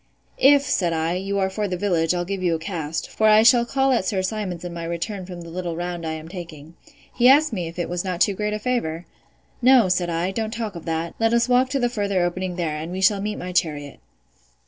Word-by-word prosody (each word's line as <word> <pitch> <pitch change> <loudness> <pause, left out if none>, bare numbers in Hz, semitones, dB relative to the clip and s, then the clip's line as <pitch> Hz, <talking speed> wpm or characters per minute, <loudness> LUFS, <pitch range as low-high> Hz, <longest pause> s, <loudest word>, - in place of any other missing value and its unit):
If, 280 +1 +6
said 175 -10 0
I, 160 +1 0
you 195 +2 -2
are 190 -1 0
for 210 +1 -2
the 180 -1 -3
village, 175 -3 +1
I'll 175 0 -2
give 195 +1 -4
you 175 -2 +1
a - - -1
cast; 165 -2 -4
for 220 - +1
I 215 0 +6
shall 235 +1 +5
call 270 +1 +1
at 240 -6 +2
Sir 190 0 -1
Simon's 185 -4 -4
in 175 - -5
my 170 -1 -6
return 180 +3 -4
from 180 -2 -8
the 170 -1 -10
little 175 -1 -4
round 175 -1 -4
I 160 - -2
am 160 0 -7
taking. 165 -3 -9 0.4
He 245 +1 +5
asked 290 0 +5
me 180 -5 -2
if 165 - -10
it 175 - -2
was 175 0 -3
not 180 -2 -3
too 200 - +3
great 210 +2 -2
a - - -1
favour?—No, 235 +3 0
said 180 -1 +1
I, 170 +3 -1
don't 220 +2 -2
talk 220 -2 -4
of 170 - -8
that; 165 +1 -2
let 225 +1 +2
us 235 +1 +2
walk 250 +1 +3
to 275 - -1
the 245 - +2
further 200 -6 -1
opening 180 +1 -2
there, 165 -4 -2
and 160 +3 -6
we 185 - -4
shall 195 +1 +3
meet 210 +1 -3
my 180 +1 -6
chariot. 150 -5 -2
185 Hz, 250 wpm, -23 LUFS, 170-215 Hz, 0.4 s, If